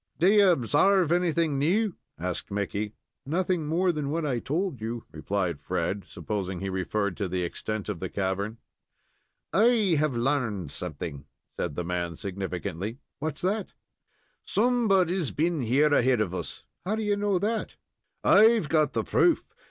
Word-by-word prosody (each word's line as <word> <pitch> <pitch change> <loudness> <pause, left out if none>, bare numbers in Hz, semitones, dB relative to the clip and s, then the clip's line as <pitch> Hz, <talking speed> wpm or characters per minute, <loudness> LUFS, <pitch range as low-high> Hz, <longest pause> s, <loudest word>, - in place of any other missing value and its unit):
"Do 175 - +3
you 205 -1 +6
obsarve 175 - +3
anything 170 -4 +2
new?" 195 +7 +2 0.2
asked 90 +1 -4
Mickey. 100 +1 -3 0.3
"Nothing 170 +2 0
more 175 +4 +2
than 150 -4 -3
what 160 +1 -1
I 130 -5 0
told 155 - -2
you," 115 +1 -4
replied 90 -7 -2
Fred, 90 +4 -2
supposing 95 -4 -4
he 95 0 -3
referred 95 +1 -1
to 100 - -1
the 90 0 -1
extent 105 +4 -4
of 105 -5 -3
the 95 - -4
cavern. 100 +4 -2 1.0
"I 215 -5 +4
have 150 -5 +1
larned 115 - 0
something," 75 -4 -6 0.3
said 85 -5 -3
the 90 - -2
man, 85 -1 -2
significantly. 95 +2 -4 0.2
"What's 150 0 -3
that?" 200 +2 -1 0.7
"Somebody's 195 - +2
been 165 0 0
here 140 +6 +3
ahead 125 -3 +4
of 100 -5 0
us." 90 - -5 0.2
"How 200 +4 0
do 220 - -2
you 205 -1 +2
know 205 -2 +1
that?" 215 +3 -2 0.5
"I've 220 -6 +6
got 155 -3 +2
the - - 0
proof. 345 - +3
135 Hz, 150 wpm, -27 LUFS, -, 1.0 s, you